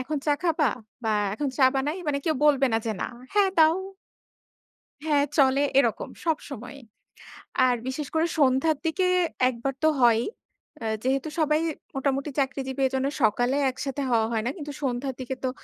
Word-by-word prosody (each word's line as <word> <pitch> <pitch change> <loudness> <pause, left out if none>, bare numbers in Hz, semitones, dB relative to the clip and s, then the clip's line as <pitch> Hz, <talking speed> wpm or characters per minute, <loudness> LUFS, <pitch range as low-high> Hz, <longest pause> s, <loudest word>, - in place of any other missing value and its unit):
এখন 300 +4 -3
চা 295 - +4
খাবা? 320 -4 +2 0.4
বা 220 - +1 0.2
এখন 285 +5 -2
চা 270 - +6
বানাই 290 +6 -1
মানে 280 -1 +1
কেউ 315 - +1
বলবে 280 -2 +4
না - - +3
যে, 220 - 0
না। - - -1 0.3
হ্যাঁ 405 -2 +4
দাও 320 +1 +6 1.3
হ্যাঁ 295 -2 +3
চলে 270 0 +4 0.2
এরকম 275 - +1 0.2
সবসময়ই। 280 -5 -4 0.9
আর 250 -1 +3
বিশেষ 275 +3 -3
করে 320 +1 +3
সন্ধ্যার 275 +3 +3
দিকে 365 +3 +1 0.4
একবার 255 +2 -3
তো - - +6
হয়ই। 235 -1 +5 0.6
অ্যা 225 - -3
যেহেতু 270 +4 0
সবাই 305 0 +2 0.3
মোটামুটি 275 +1 -1
চাকরিজীবী 270 0 -2
এজন্যে 265 +1 -1
সকালে 245 +5 +2
একসাথে 270 +2 -4
হওয়া 225 -2 +3
হয় 220 -2 0
না। 245 - 0
কিন্তু 295 -3 -6
সন্ধ্যার 260 0 -2
দিকে 260 +1 -4
তো 260 - +1
275 Hz, 160 wpm, -26 LUFS, 255-300 Hz, 1.3 s, চা